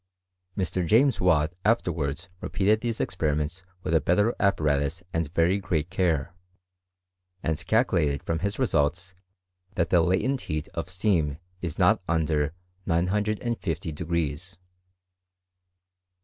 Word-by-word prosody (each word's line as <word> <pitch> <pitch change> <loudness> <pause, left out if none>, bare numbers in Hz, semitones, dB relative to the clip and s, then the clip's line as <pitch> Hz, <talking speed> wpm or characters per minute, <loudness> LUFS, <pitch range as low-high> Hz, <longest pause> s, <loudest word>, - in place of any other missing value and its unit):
Mr. 95 -1 0
James 120 - +3
Watt 80 -3 +3
afterwards 85 -8 0
repeated 105 +4 +1
these 115 -2 -2
experi 75 -2 0
ments 75 +5 -3 0.2
with - - -1
a 80 - +4
better 105 +9 +2
apparatus 75 -3 +1
and 80 -3 -1
very 85 +4 +2
great 85 -3 -2
care, 85 -5 0 1.1
and 80 -1 -1
calculated 85 - +2
from 80 0 -1
his 100 +1 -2
results 90 - 0 0.6
that 85 -2 0
the 85 - +5
latent 110 +10 +1
heat 75 0 -2
of 85 +2 -5
steam 90 -6 +1 0.2
is 85 -4 -4
not - - +4
under 80 -2 +1 0.4
950 95 -1 -1
degrees. 85 +2 -3
85 Hz, 120 wpm, -26 LUFS, 75-95 Hz, 1.1 s, the